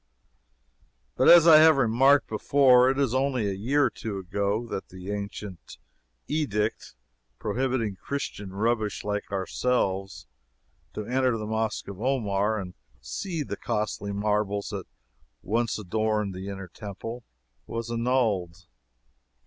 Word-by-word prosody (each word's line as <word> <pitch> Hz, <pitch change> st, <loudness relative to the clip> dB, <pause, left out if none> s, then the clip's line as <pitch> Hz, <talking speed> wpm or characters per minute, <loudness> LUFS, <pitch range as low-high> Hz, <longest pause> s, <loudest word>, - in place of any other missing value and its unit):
But, -, -, +4 dB
as 170 Hz, -1 st, +9 dB
I 160 Hz, -2 st, +10 dB
have 160 Hz, -2 st, +7 dB
remarked 135 Hz, +3 st, +4 dB
before, 125 Hz, +2 st, +4 dB
it 135 Hz, -, 0 dB
is 135 Hz, -4 st, +1 dB
only 130 Hz, -4 st, +1 dB
a 100 Hz, -, -1 dB
year 130 Hz, +9 st, +1 dB
or -, -, +2 dB
two 105 Hz, -1 st, -5 dB
ago 100 Hz, +4 st, -1 dB
that 110 Hz, -, -6 dB
the 90 Hz, +2 st, -8 dB
ancient 100 Hz, -2 st, -7 dB, 0.5 s
edict 110 Hz, -, -2 dB, 0.4 s
prohibiting 115 Hz, -2 st, -1 dB
Christian 105 Hz, -7 st, -5 dB
rubbish 110 Hz, +1 st, -1 dB
like 105 Hz, 0 st, -3 dB
ourselves 95 Hz, -1 st, -1 dB, 0.7 s
to 105 Hz, -, -4 dB
enter 130 Hz, -1 st, +1 dB
the 110 Hz, -, -5 dB
Mosque 110 Hz, 0 st, -2 dB
of 100 Hz, 0 st, -8 dB
Omar 110 Hz, -5 st, 0 dB
and 90 Hz, -2 st, -7 dB, 0.3 s
see 170 Hz, -6 st, -4 dB
the -, -, -5 dB
costly 105 Hz, -2 st, -2 dB
marbles 105 Hz, 0 st, -1 dB
that -, -, -6 dB, 0.6 s
once 115 Hz, +2 st, 0 dB
adorned 105 Hz, 0 st, -1 dB
the 95 Hz, +1 st, -7 dB
inner 95 Hz, -1 st, -6 dB
Temple 105 Hz, +6 st, -7 dB, 0.4 s
was 115 Hz, 0 st, -4 dB
annulled. 110 Hz, -8 st, 0 dB
110 Hz, 130 wpm, -26 LUFS, 100-125 Hz, 0.7 s, I